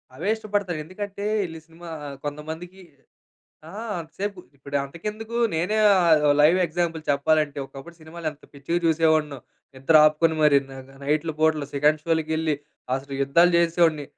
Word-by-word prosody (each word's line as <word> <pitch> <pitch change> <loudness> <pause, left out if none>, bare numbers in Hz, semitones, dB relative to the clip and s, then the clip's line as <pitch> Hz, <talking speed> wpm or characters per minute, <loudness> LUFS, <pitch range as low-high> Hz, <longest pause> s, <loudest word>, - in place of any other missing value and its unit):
అవే 170 +9 -3
ఇష్టపడతారు. 205 -6 -2
ఎందుకంటే 200 +2 -7 0.2
ఈళ్ళీ 165 -1 -8
సినిమా 165 +1 -12 0.4
కొంతమందికి 160 +6 -7 0.9
ఆ! - - -11 0.3
అంతసేపు 185 +5 -5 0.2
ఇప్పుడు 140 +1 -5
అంతకెందుకు 210 +10 -6 0.2
నేనే 180 +7 0 0.2
ఆహ్, 165 -5 +4 0.2
లైవ్ 160 +5 +5
ఎగ్జాంపుల్ 165 -1 -2
చెప్పాలంటే. 145 +1 +1
ఒకప్పుడు 135 +6 -12
సినిమాలు 160 +1 -9
ఎంత 150 - -17
పిచ్చిగా 140 +5 -2
చూసేవాడినో. 155 -3 +2 0.4
నిద్ర 135 +5 0
ఆపుకొని 160 +1 +2
మరి. 145 -2 +6
నగ 135 0 -11
నైట్‌లు 155 +3 0
పూటలు 155 -2 +2
సెకండ్ 150 +2 +2
షో‌లకెళ్ళి 160 -1 0 0.4
అసలు 135 +1 -6
యుద్ధాలు 170 +6 +4
చేసేవాడిని. 165 -3 +2
160 Hz, 130 wpm, -24 LUFS, 150-175 Hz, 0.9 s, మరి